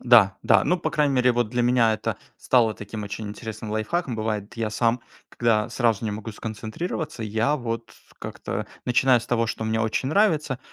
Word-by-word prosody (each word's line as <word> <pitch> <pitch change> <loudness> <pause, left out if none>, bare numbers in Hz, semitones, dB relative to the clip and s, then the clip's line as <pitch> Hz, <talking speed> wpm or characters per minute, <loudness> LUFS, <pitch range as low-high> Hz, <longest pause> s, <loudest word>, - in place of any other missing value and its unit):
Да 110 -6 +6
да. - - +4
Ну 180 - +2
по 155 - -2
крайней 150 -3 +2
мере 125 -1 +4
вот 120 -2 0
для 120 0 0
меня 120 -2 +4
это - - -3 0.2
стало 115 -4 +3
таким 105 +1 -7
очень 105 +1 -5
интересным 110 0 -7
лайфхаком. 120 +5 -1
Бывает, 110 0 -3
я 115 -2 -1
сам, 115 +2 +1 0.3
когда 115 -2 +1
сразу 115 -3 +1
не 110 - -1
могу 110 +2 -6
сконцентрироваться, 115 - -5
я 110 +7 +1
вот 115 -3 -4 0.3
как-то - - -5 0.2
начиная 125 +1 +4
с 120 - -10
того, 115 -2 +1
что 110 0 -3
мне 110 0 0
очень 110 +4 0
нравится 155 - +2
115 Hz, 185 wpm, -24 LUFS, 110-125 Hz, 0.3 s, Да